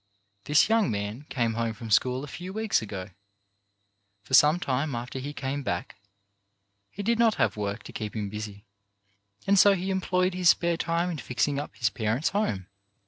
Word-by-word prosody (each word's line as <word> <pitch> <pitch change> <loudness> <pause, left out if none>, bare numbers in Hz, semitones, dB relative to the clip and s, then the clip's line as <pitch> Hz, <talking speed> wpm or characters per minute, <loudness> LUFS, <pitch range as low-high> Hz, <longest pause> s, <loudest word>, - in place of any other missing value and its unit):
This 150 0 +4
young 225 -2 +3
man 105 +7 -4
came 115 -3 0
home 115 -1 -2
from 115 0 -8
school 125 +5 +3
a - - -6
few 180 +5 -7
weeks 215 - +1
ago. 100 -3 -6 1.1
For 120 - -11
some 150 +5 +6
time 140 -2 -1
after 125 +3 -5
he 140 +3 -5
came 140 0 -3
back 90 -5 -3 0.9
he 205 - -7
did 230 +2 +1
not 230 -2 +4
have - - +1
work 100 +1 -3
to - - -11
keep 105 -1 -5
him 105 -2 -2
busy, 105 0 -7 0.8
and 200 0 +4
so 200 +1 +7
he 190 +1 -2
employed 185 -1 +1
his 180 -2 +3
spare 170 +1 +3
time 170 +2 -1
in 160 - -5
fixing 140 +3 -1
up 145 - -7
his 110 -3 0
parents' 110 +6 0
home. 195 - -1
135 Hz, 185 wpm, -27 LUFS, 110-180 Hz, 1.1 s, so